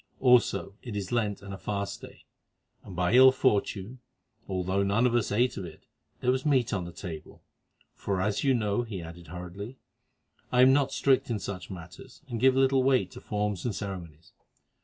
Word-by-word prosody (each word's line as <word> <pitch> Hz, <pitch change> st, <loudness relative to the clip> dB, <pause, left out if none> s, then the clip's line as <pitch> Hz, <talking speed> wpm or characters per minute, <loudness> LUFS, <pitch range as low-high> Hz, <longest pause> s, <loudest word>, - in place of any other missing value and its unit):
Also, 120 Hz, -6 st, +3 dB
it 120 Hz, -5 st, -7 dB
is 100 Hz, -2 st, -4 dB
Lent 105 Hz, -4 st, -1 dB
and 100 Hz, 0 st, -7 dB
a 95 Hz, -, -8 dB
fast 100 Hz, +1 st, -4 dB
day, -, -, -13 dB, 0.6 s
and 95 Hz, -, -10 dB
by 90 Hz, +3 st, +1 dB
ill 130 Hz, +1 st, +9 dB
fortune, 115 Hz, -2 st, 0 dB, 0.5 s
although 95 Hz, +1 st, -1 dB
none 100 Hz, +5 st, +2 dB
of 125 Hz, -, +2 dB
us 120 Hz, -3 st, +1 dB
ate 120 Hz, +5 st, +1 dB
of 95 Hz, -, -4 dB
it, -, -, -12 dB, 0.4 s
there 125 Hz, -, +3 dB
was 130 Hz, 0 st, -1 dB
meat 130 Hz, -6 st, +2 dB
upon 95 Hz, -5 st, -2 dB
the 85 Hz, -, -7 dB
table, 85 Hz, -3 st, -9 dB, 0.5 s
for 100 Hz, -2 st, -3 dB
as 100 Hz, +2 st, 0 dB
you 135 Hz, -2 st, +3 dB
know," 105 Hz, -1 st, 0 dB
he 110 Hz, -5 st, -5 dB
added 85 Hz, +1 st, -10 dB
hurriedly, 90 Hz, -, -8 dB, 0.7 s
"I 125 Hz, 0 st, +5 dB
am 130 Hz, +1 st, +7 dB
not 140 Hz, -1 st, +2 dB
strict 135 Hz, -2 st, +2 dB
in 115 Hz, -, 0 dB
such 95 Hz, -3 st, -6 dB
matters, 95 Hz, -, -11 dB
who 120 Hz, -3 st, -4 dB
give 130 Hz, +2 st, +5 dB
little 135 Hz, 0 st, +4 dB
weight 130 Hz, -8 st, +2 dB
to -, -, -11 dB
forms 105 Hz, -3 st, -2 dB
and 115 Hz, -5 st, -2 dB
ceremonies. 85 Hz, -6 st, -7 dB
105 Hz, 190 wpm, -28 LUFS, 95-125 Hz, 0.7 s, ill